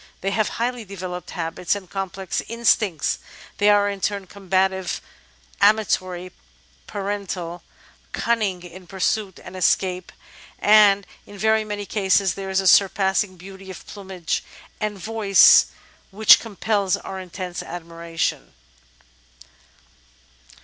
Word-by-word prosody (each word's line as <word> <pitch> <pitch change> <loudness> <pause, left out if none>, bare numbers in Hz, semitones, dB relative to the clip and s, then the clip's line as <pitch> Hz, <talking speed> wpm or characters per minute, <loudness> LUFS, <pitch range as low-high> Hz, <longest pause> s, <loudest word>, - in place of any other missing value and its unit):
They 195 - -1
have 215 +1 +1
highly 240 0 -2
developed 185 -3 -7
habits 170 +2 -2
and 195 -2 -8
complex 190 0 -4
instincts: 220 -8 +1 0.4
they 205 +1 +4
are 205 0 +4
in 200 -1 -4
turn 200 -1 -1
com 190 0 -15
bative, 190 0 +1 0.6
amatory, 185 -4 +2 0.6
parental, 195 -4 -4 0.5
cunning 210 -6 -1
in 180 +1 -12
pursuit 195 +1 -1
and - - -10
escape, 185 0 0 0.5
and 205 -2 +5 0.2
in 205 - -12
very 220 +2 +2
many 205 -1 -5
cases 195 -2 +2
there 195 -1 -6
is 190 0 +1
a 190 - -1
surpassing 190 0 +3
beauty 190 +1 -12
of 185 - -10
plumage 190 -4 -4 0.4
and 210 -1 -2
voice 205 -1 +5 0.4
which 215 +2 +7
compels 205 -3 -1
our 190 - -7
intense 185 -1 -6
admiration. 170 -1 -4
195 Hz, 115 wpm, -22 LUFS, 185-205 Hz, 0.6 s, which